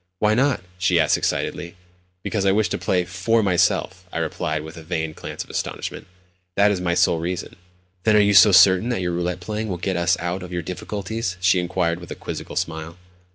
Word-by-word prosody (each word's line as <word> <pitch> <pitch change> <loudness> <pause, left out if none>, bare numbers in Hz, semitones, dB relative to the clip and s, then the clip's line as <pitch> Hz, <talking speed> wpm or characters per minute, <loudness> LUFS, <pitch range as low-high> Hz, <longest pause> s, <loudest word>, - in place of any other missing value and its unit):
"Why 105 +3 +2
not?" 130 -3 +1 0.2
she 90 -1 +3
asked 80 - +3
excitedly. 85 0 -2 0.5
"Because 100 0 -1
I 100 - +4
wish 105 -1 +2
to - - -2
play 90 0 0
for 95 +6 +1
myself," 95 0 +1
I - - -5
replied 80 -1 -2
with 80 +1 -10
a 80 - -10
feigned 80 -2 -3
glance - - -6
of - - -14
astonishment. - - -4 0.5
"That 100 +1 +4
is 95 -3 -1
my 85 -1 0
sole 85 - +3
reason." 90 +2 -4 0.5
"Then 110 0 +4
are - - +6
you 100 0 +4
so 95 +2 +8
certain 95 +4 +6
that 120 -6 -1
your 90 -1 -1
roulette 90 +1 -2
playing 105 +4 -4
will 90 -4 -3
get 90 +1 -2
us 85 0 +2
out 90 +2 -3
of 90 0 -8
our 90 -1 -3
difficulties?" 95 +2 -4
she 95 0 +3
inquired 85 -1 -1
with 85 - -11
a - - -5
quizzical - - -7
smile. 80 +1 -4
90 Hz, 210 wpm, -22 LUFS, 85-100 Hz, 0.5 s, so